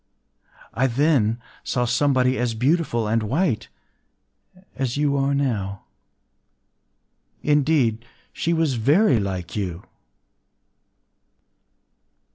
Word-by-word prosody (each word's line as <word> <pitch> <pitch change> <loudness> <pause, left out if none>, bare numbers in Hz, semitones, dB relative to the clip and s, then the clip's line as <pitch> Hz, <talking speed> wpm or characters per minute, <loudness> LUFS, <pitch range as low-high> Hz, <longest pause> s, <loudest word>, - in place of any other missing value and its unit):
I 130 +3 +2
then 125 -4 +2 0.2
saw 125 -1 -1
somebody 130 +1 +2
as 120 -2 -1
beautiful 125 -3 +1
and 115 +2 +1
white 130 - 0 1.1
as 130 -1 -2
you 145 -1 +1
are 140 0 +1
now—indeed, 115 - -3 0.3
she 170 - -1
was 160 -4 +1
very 140 - +3
like 95 -4 -4
you. 90 -4 -4
125 Hz, 85 wpm, -23 LUFS, 110-145 Hz, 1.1 s, very